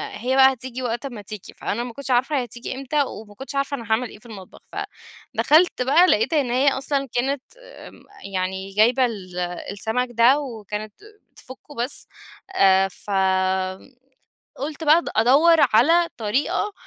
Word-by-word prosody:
هي 255 +4 -1
بقى 265 0 +6
هتيجي 255 +1 -7
وقت 240 +3 -3
امَّا 240 -6 -7
تيجي، 205 0 -9
فأنا 235 +4 -3
ما 245 -2 -7
كُنتش 280 0 -6
عارفة 265 +3 +2
هتيجي 240 +2 -7
إمتى، 275 +2 0
وما 210 -5 -9
كُنتش 270 +3 -8
عارفة 275 +1 -1
أنا 235 - -9
هاعمل 230 +2 +1
إيه - - -13
في - - -23
المطبخ. 195 -5 -12 0.7
فدَخَلت 315 -3 +3
بقى 295 +8 +5
لقيت 220 +7 +2
إن 275 -6 +1
هي 260 +3 +2
أصلًا 275 0 -2
كانت 265 +2 -1 0.2
آآ، - - -13 0.4
يعني 190 +1 -3
جايبة 240 +5 +4
ال 185 -6 -6 0.3
السمَك 220 +5 -2
ده 240 +5 +4
وكانت 215 -5 -6 0.4
بتفُكُّه 260 +3 -13
بس، 245 +4 -4 0.5
آآ، 190 0 +5
فقُلت 190 +5 -2 0.8
بقى 305 +2 +6
أد - - -6
أدوّر 280 +9 +5 0.2
على 330 +9 +5
طريقة 290 - -1
245 Hz, 155 wpm, -22 LUFS, 210-275 Hz, 0.8 s, بقى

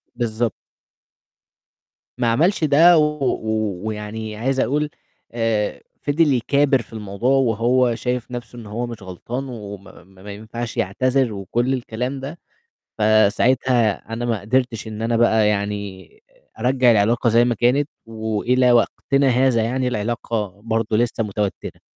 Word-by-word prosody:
بالضبط. 115 -1 -1 1.7
ما 120 -1 0
عملش 165 - +2
ده 160 +4 +6
و 150 -3 +1 0.5
ويعني 110 0 -5
عايز 135 +4 -1
أقول، 150 +3 0 0.4
آآ، 115 -3 -1 0.2
فضل 145 0 +2
يكابر 135 +2 +2
في 115 - -16
الموضوع، 105 +2 -3
وهو 120 0 +2
شايف 125 0 -3
نَفْسه 120 -1 -7
إن 115 - -10
هو 115 +4 -4
مش 115 -3 -8
غلطان 105 +8 -6
وما 100 -6 -10
ما 95 +1 -20
ما 105 - -8
ينفعش 110 +3 -6
يعتذر 130 +5 +1
وكل 120 +6 -1
الكلام 125 +2 -3
ده، 145 +6 -7 0.6
فساعتها 110 +2 +3 0.2
أنا 120 +1 -3
ما 115 -3 -1
قدرتش 120 +1 -1
إن 110 0 -6
أنا 115 +1 0
بقى 110 -2 +4
يعني 100 -3 -3 0.5
أرجّع 125 +1 +3
العلاقة 115 +3 +2
زي 115 +2 +4
ما 120 -1 0
كانت 130 +6 +2 0.2
وإلى 115 +3 +1
وقتنا 135 +3 +2
هذا 125 -2 +3
يعني 125 +3 -1
العلاقة 110 -3 -3
برضه 110 -1 -1
لسه 115 0 0
متوتّرة. 105 -1 -4
115 Hz, 135 wpm, -21 LUFS, 110-130 Hz, 1.7 s, ده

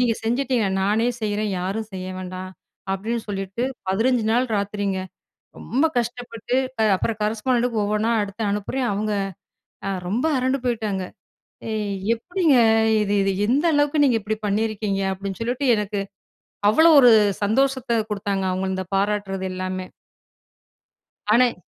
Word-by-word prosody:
"நீங்க 240 -2 +2
செஞ்சுட்டீங்க. 245 -2 +1 0.2
நானே 220 +4 +2
செய்றேன் 210 0 -1
யாரும் 210 +4 -3
செய்ய 185 0 -5
வேண்டாம்" 185 0 -6 0.4
அப்டின்னு 225 +4 -3
சொல்லிட்டு 195 +3 -3 0.3
15 230 +4 +2
நாள் 250 +2 +2
ராத்திரிங்க. 200 -1 -2 0.6
ரொம்ப 275 +6 0
கஷ்டப்பட்டு, 240 0 -4 0.3
அ - - +4
அப்புறம் 220 +1 -2
கரஸ்பாண்டெட்டுக்கு 230 +1 0
ஒவ்வொண்ணா 215 +2 0
எடுத்து 205 +2 -5
அனுப்புறேன். 240 +5 -2
அவுங்க 210 +1 -1 0.8
அ - - 0 0.2
ரொம்ப 235 +10 0
அரண்டு 260 +2 +1
போய்ட்டாங்க. 215 -6 -1 0.7
"ஏய் 210 -2 -2 0.2
எப்டிங்க? 325 +2 +2 0.4
இது 205 -1 0
இது 195 0 +1
எந்த 275 +7 +2
அளவுக்கு 290 +1 +3
நீங்க 240 -4 +3
இப்டி 215 +1 -3
பண்ணியிருக்கீங்க?" 210 -1 -1
அப்படின்னு 195 0 -6
சொல்லிட்டு 245 +4 -1
எனக்கு, 205 -1 -2 0.7
அவ்வளோ 320 +9 +6
ஒரு 245 -2 +8 0.3
சந்தோஷத்த 260 +3 +1 0.2
குடுத்தாங்க 200 -2 -1
அவுங்க, 185 +1 -2
இந்த 185 0 -4
பாராட்டுறது 195 -1 -1
எல்லாமே. 185 0 -4 1.5
ஆனா 250 +3 +6
எ - - -18
215 Hz, 130 wpm, -23 LUFS, 195-245 Hz, 1.5 s, ஒரு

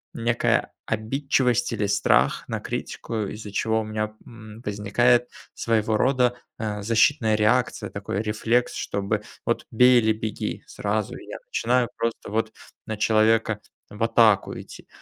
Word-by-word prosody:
некая 115 0 +1
обидчивость 125 +2 0
или 105 - -1
страх 100 0 +2
на - - -3
критику, 115 - -5
из-за 105 +1 -7
чего 110 +2 +1
у - - -4
меня, 110 0 -3
м, 110 -1 -12
возникает 120 +4 +2 0.2
своего 110 -1 0
рода, 125 0 +2 0.2
э, 105 -2 -3
защитная 115 +1 +3
реакция, 105 0 +1
такой 100 0 -3
рефлекс, 110 +3 0
чтобы 100 +1 -2 0.2
вот - - -1
бей 125 +2 +6
или 110 0 +2
беги 110 0 -4
сразу. - - -2
И - - -11
я - - -7
начинаю 125 - +1
просто 115 0 -3
вот 110 0 0 0.3
на 110 - -4
человека 110 0 +3 0.3
в 105 +2 -4
атаку 115 -3 +3
идти. - - -12
110 Hz, 140 wpm, -24 LUFS, 105-120 Hz, 0.3 s, бей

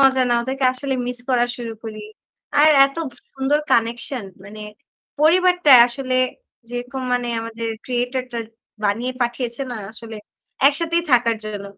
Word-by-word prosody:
মজা 265 -1 +5
না। - - +4
ওদেরকে 265 +1 -2
আসলে 265 +1 -3
মিস 245 0 -4
করা 245 -2 +3
শুরু 235 -2 -6
করি। 215 -1 -7 0.6
আর 305 +1 +7 0.2
এত 275 +3 -12 0.2
সু - - -22
সুন্দর 270 +2 +1
কানেকশন 235 +1 0 0.2
মানে 210 +1 -10 0.6
পরিবারটা 360 -1 +5
আসলে 255 +1 -4 0.6
যেরকম 245 +2 -5
মানে 245 -1 0
আমাদের 230 0 -5 0.2
ক্রিয়েটরটা 250 0 -2 0.5
বানিয়ে 230 +5 0
পাঠিয়েছে 240 +1 -3
না 240 - -4 0.2
আসলে 225 -1 -9 0.5
একসাথেই 335 +4 +2
থাকার 235 -2 +4
জন্য। 205 -2 -6
245 Hz, 140 wpm, -21 LUFS, 230-270 Hz, 0.6 s, আর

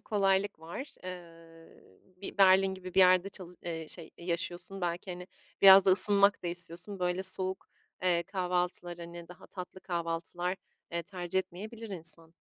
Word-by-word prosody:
kolaylık 195 -2 +1
var. 170 - -8
Eee, 165 - -12 0.2
bir 200 +2 -8
Berlin 190 0 +5
gibi 185 -1 -10
bir - - +1
yerde 185 +1 +5
çalı 180 -2 -9
eee, 165 -2 -5
şey, 165 -1 -9
yaşıyorsun 175 +2 -4
belki, 175 +1 -3
hani, 180 0 -7 0.4
biraz 195 0 +10
da 195 - +5
ısınmak 200 +1 +5
da - - -4
istiyorsun. 175 +3 -5
Böyle 180 +1 -1
soğuk, 190 0 -2 0.3
eee, 175 -2 +2
kahvaltılar, 180 -1 -2
hani, 170 0 -9
daha 180 - -13
tatlı 185 0 -9
kahvaltılar, 175 +1 -3 0.3
eee, 170 0 -2
tercih 180 0 -3
etmeyebilir 210 +5 -6
insan. 165 -3 -2
180 Hz, 150 wpm, -31 LUFS, 170-190 Hz, 0.4 s, biraz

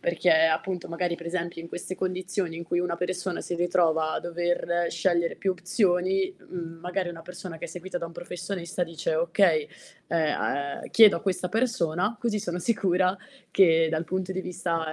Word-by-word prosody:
Perché 170 +1 +2
appunto 160 +3 +2
magari 170 0 -1
per 170 - -10
esempi 170 -1 -3
in 165 - -6
queste 180 +2 -6
condizioni 185 -2 -2
in 170 - -5
cui 175 +1 -1
una 175 -1 0
persona 180 0 -2
si 175 - -4
ritrova 165 -2 +2
a - - -1
dover 175 0 0
scegliere 170 0 +1
più 195 - 0
opzioni, 185 0 +1
mhmm, 165 -2 -7
magari 180 +1 -2
una 165 -1 -8
persona 180 -1 -8
che - - -6
è - - -2
seguita 175 +2 -5
da 170 - -4
un 165 - -11
professionista 175 0 -4
dice: 335 - -2
"Okay, 475 -2 +3 0.4
ehm, 145 -3 0
uhm, - - -9
chiedo 220 -5 +8
a - - -4
questa 185 -2 -1
persona, 215 -2 0
così 225 -3 0
sono 175 -2 -3
sicura 185 -3 +2 0.3
che 165 -4 +5
dal 160 +1 -1
punto 185 +2 -2
di 190 - -2
vista 165 -3 -2
175 Hz, 180 wpm, -27 LUFS, 170-185 Hz, 0.4 s, chiedo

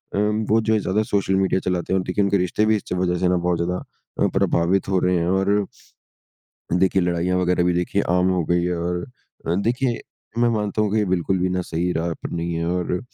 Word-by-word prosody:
अ, - - -1
वो 105 +1 +2
जो 110 0 +1
है 110 - +3
ज़्यादा 100 +2 0
सोशल 100 -2 0
मीडिया 95 0 +2
चलाते 90 0 -1
हैं 95 - +3
और - - -2
देखिए 100 +3 +1
उनके 100 0 +2
रिश्ते 90 +4 +1
भी 110 0 +3
इस 105 - -3
च - - -3
वज़ह 90 -1 0
से 90 - +2
ना 90 - +3
बहुत 90 0 0
ज़्यादा 90 +2 -2 0.4
अ, - - +4
प्रभावित 90 +4 +1
हो 95 -1 +2
रहे 90 0 +2
हैं 85 0 0
और 95 +2 +2 1.2
देखिए 95 +1 +3
लड़ाइयाँ 90 +1 0
वग़ैरह 90 -1 +2
भी 90 - +2
देखिए 90 +3 0
आम 90 +1 +3
हो 90 -2 0
गई 85 +2 +1
है 90 0 -1
और 90 +1 -2 0.4
अ, 85 - +1
देखिए 120 +5 0 0.4
मैं 120 0 +4
मानता 105 -1 0
हूँ 105 - 0
कि 110 - +2
ये 105 - +2
बिल्कुल 95 0 0
भी 90 +1 +1
ना 90 0 -1
सही 85 +2 -2
राह 85 0 -1
पर - - -5
नहीं 85 0 -3
है 85 0 -2
और 90 0 -1
अ, 90 - 0
90 Hz, 245 wpm, -22 LUFS, 90-100 Hz, 1.2 s, अ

